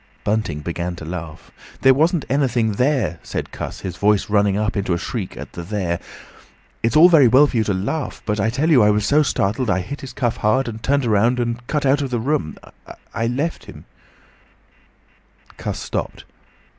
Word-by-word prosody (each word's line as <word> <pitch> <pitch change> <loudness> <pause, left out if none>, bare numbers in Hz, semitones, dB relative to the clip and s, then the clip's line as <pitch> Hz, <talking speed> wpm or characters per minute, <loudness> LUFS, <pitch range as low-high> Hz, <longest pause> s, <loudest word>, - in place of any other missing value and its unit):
Bunting 100 -8 -1
began 85 +2 -4
to 80 - -9
laugh. 80 -2 -7 0.3
"There 135 0 +6
wasn't 160 +4 +1
anything 125 -5 +1
there!" 110 - 0
said - - -5
Cuss, - - -6
his 90 -2 -6
voice 105 0 +1
running 100 -1 +3
up 105 +1 -1
into 100 -3 0
a - - -1
shriek 100 +2 -5
at - - -8
the 85 - -6
"there." 85 -2 -2 0.8
"It's 115 +5 0
all 160 +3 +9
very 160 -7 +6
well 130 +5 +6
for 135 - -2
you 110 - +3
to 100 - 0
laugh, 125 +10 -3
but 105 0 -1
I 105 +3 +1
tell 145 +8 0
you 130 -6 +6
I 105 - +5
was 105 0 +1
so 150 +2 +4
startled, 115 -3 0
I 95 -1 +1
hit 140 +10 -7
his 130 -2 -8
cuff 120 -3 -1
hard, 110 +5 +1
and 110 -1 -6
turned 140 +2 +1
around, 115 +3 +2
and 120 0 -3
cut 150 -2 -1
out 140 +2 +3
of 140 - -2
the 125 - -1
room—I 115 - -4
left 140 +8 -2
him—" - - -12 1.7
Cuss - - -4
stopped. - - -5
115 Hz, 195 wpm, -20 LUFS, 100-135 Hz, 1.7 s, all